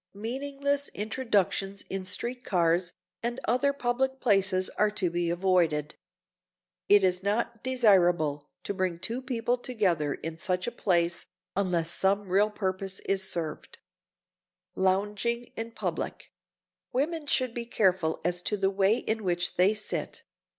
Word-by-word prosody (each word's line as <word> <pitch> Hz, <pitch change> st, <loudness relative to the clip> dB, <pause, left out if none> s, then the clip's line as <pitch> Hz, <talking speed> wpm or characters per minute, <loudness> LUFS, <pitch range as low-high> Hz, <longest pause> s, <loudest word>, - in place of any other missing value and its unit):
Meaningless 280 Hz, +6 st, -2 dB
introductions 205 Hz, -3 st, 0 dB
in 190 Hz, -1 st, -4 dB
street 240 Hz, +6 st, -3 dB
cars 175 Hz, 0 st, +1 dB, 0.3 s
or 235 Hz, +1 st, 0 dB
other 255 Hz, +4 st, +3 dB
public 265 Hz, 0 st, -1 dB
places 195 Hz, -5 st, +2 dB
are 210 Hz, -, +2 dB
to 190 Hz, -4 st, 0 dB
be 175 Hz, 0 st, 0 dB
avoided. 170 Hz, -4 st, +1 dB, 1.0 s
It 205 Hz, -1 st, +7 dB
is 180 Hz, -1 st, +2 dB
not 220 Hz, +3 st, -1 dB
desirable 175 Hz, -, +3 dB
to -, -, -3 dB
bring 185 Hz, -3 st, -1 dB
two 230 Hz, +8 st, -3 dB
people 245 Hz, -1 st, -1 dB
together 180 Hz, -, 0 dB
in 165 Hz, +1 st, -7 dB
such 180 Hz, +1 st, -1 dB
a 240 Hz, -, -2 dB
place 175 Hz, -6 st, 0 dB, 0.3 s
unless 175 Hz, -4 st, +1 dB
some 195 Hz, +1 st, +1 dB
real 200 Hz, +3 st, +4 dB
purpose 190 Hz, -2 st, -3 dB
is 195 Hz, -1 st, 0 dB
served. 160 Hz, -3 st, -4 dB, 1.0 s
[Sidenote: 190 Hz, -, -1 dB
LOUNGING 210 Hz, +5 st, -1 dB
IN 225 Hz, +1 st, -4 dB
PUBLIC] -, -, -4 dB, 0.6 s
Women 300 Hz, +4 st, -1 dB
should 255 Hz, -4 st, +1 dB
be 235 Hz, 0 st, -4 dB
careful 185 Hz, -8 st, +1 dB
as 175 Hz, 0 st, 0 dB
to 210 Hz, +3 st, -1 dB
the 195 Hz, 0 st, +1 dB
way 195 Hz, +2 st, +3 dB
in 220 Hz, -3 st, -2 dB
which 175 Hz, -2 st, 0 dB
they 190 Hz, +4 st, +4 dB
sit. 215 Hz, -, -4 dB
195 Hz, 140 wpm, -28 LUFS, 180-235 Hz, 1.0 s, It